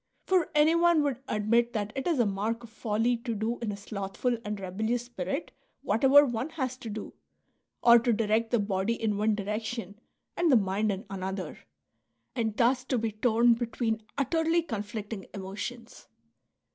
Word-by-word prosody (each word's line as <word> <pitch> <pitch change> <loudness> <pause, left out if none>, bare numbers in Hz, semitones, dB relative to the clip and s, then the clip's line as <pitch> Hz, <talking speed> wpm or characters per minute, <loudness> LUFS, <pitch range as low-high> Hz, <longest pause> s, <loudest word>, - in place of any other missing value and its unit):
For 370 -3 +2
anyone 325 +1 +4
would 270 -3 -1
admit 230 +3 +1
that 210 -2 -2
it 270 +3 -3
is 335 -4 +2
a 240 - +3
mai 205 +3 0
k 230 - -14
of 235 -2 -12
folly 225 +2 0
to 230 -1 -4
do 220 +3 -2
in 230 -3 -2
a 200 - -6
slothful 200 +4 -2
and 210 -1 -4
rebellious 220 +6 -2
spirit 240 - -4 0.3
whatever 270 +7 +6
one 245 +2 -2
has 260 -6 -3
to 245 -3 -8
do, 215 0 -6 0.7
or 235 0 +8
to 235 +1 +1
direct 225 +1 +1
the 240 - +2
body 205 +2 -1
in 215 -2 0
one 210 +1 +2
direction 210 0 -4 0.4
and 345 -2 +2
the - - +7
mind 205 +1 +1
in 195 +2 -5
another, 190 0 -4 0.8
and 220 -4 -1
thus 250 +2 +3
to 260 - 0
be 225 -1 -1
torn 235 +2 +3
between 230 -1 -2 0.2
utterly 325 +4 +1
conflicting 210 - -5
emotions. 205 +5 -7
225 Hz, 170 wpm, -29 LUFS, 210-245 Hz, 0.8 s, or